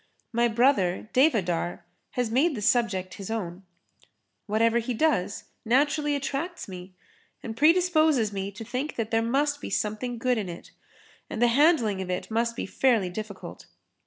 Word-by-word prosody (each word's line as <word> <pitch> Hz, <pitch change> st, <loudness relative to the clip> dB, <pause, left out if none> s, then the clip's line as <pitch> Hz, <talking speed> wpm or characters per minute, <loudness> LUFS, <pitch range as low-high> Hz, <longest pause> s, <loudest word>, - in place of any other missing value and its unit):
My 235 Hz, +1 st, +3 dB
brother, 220 Hz, -5 st, +2 dB
Devadhar, 195 Hz, -, +1 dB, 0.3 s
has 245 Hz, -3 st, -1 dB
made 285 Hz, +6 st, +2 dB
the 215 Hz, -, -5 dB
subject 195 Hz, -6 st, +1 dB
his 195 Hz, -, -6 dB
own. 190 Hz, -5 st, -4 dB, 0.9 s
Whatever 225 Hz, +2 st, +2 dB
he 235 Hz, +1 st, -3 dB
does, 250 Hz, -, 0 dB, 0.2 s
naturally 290 Hz, +5 st, +2 dB
attracts 285 Hz, +5 st, -4 dB
me 185 Hz, -1 st, -10 dB, 0.5 s
and 225 Hz, -, -5 dB
predisposes 310 Hz, -, +3 dB
me 195 Hz, 0 st, -3 dB
to 220 Hz, +3 st, -8 dB
think 255 Hz, +6 st, -3 dB
that 230 Hz, -1 st, -3 dB
there 225 Hz, 0 st, +3 dB
must 285 Hz, +5 st, 0 dB
be -, -, -5 dB
something 225 Hz, +3 st, -2 dB
good 245 Hz, 0 st, +1 dB
in 195 Hz, -4 st, -4 dB
it 170 Hz, -, -9 dB, 0.6 s
and -, -, -5 dB
the 240 Hz, 0 st, +4 dB
handling 240 Hz, -, +3 dB
of 185 Hz, -, -5 dB
it 180 Hz, +4 st, -3 dB
must 230 Hz, +1 st, 0 dB
be -, -, -3 dB
fairly 225 Hz, -9 st, +1 dB
difficult. 205 Hz, 0 st, -8 dB
230 Hz, 160 wpm, -26 LUFS, 205-275 Hz, 0.9 s, the